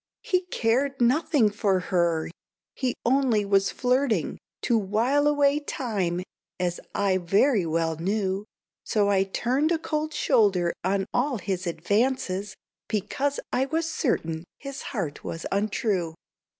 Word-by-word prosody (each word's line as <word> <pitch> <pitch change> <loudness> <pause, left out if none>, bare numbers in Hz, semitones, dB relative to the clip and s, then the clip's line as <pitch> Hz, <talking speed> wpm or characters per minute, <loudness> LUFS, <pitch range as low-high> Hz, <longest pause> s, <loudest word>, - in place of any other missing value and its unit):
"He 370 -7 0
cared 265 0 0
nothing 250 -2 +3
for 200 -2 +1
her; 170 -3 +2 0.5
he 255 -2 -1
only 245 -4 +3
was 195 0 +3
flirting 250 - 0 0.2
To 240 - +2
while 230 +8 +2
away 290 0 +3
time, 200 - -2 0.4
as 175 -1 -1 0.2
I 195 -2 +2
very 195 +3 +3
well 165 0 0
knew; 195 +2 -1 0.4
So 205 -2 +2
I 195 -1 +4
turned 255 - 0
a 335 - +3
cold 310 -1 -2
shoulder 200 - +2
on 195 +1 +1
all 255 +1 +1
his 190 -2 -3
advances, 205 0 0 0.3
Because 230 +7 -1
I 265 +2 +2
was 325 +2 -1
certain 165 - -1
his 275 0 -7
heart 180 - -4
was 165 - -5
untrue." 195 -4 0
215 Hz, 130 wpm, -26 LUFS, 190-270 Hz, 0.5 s, I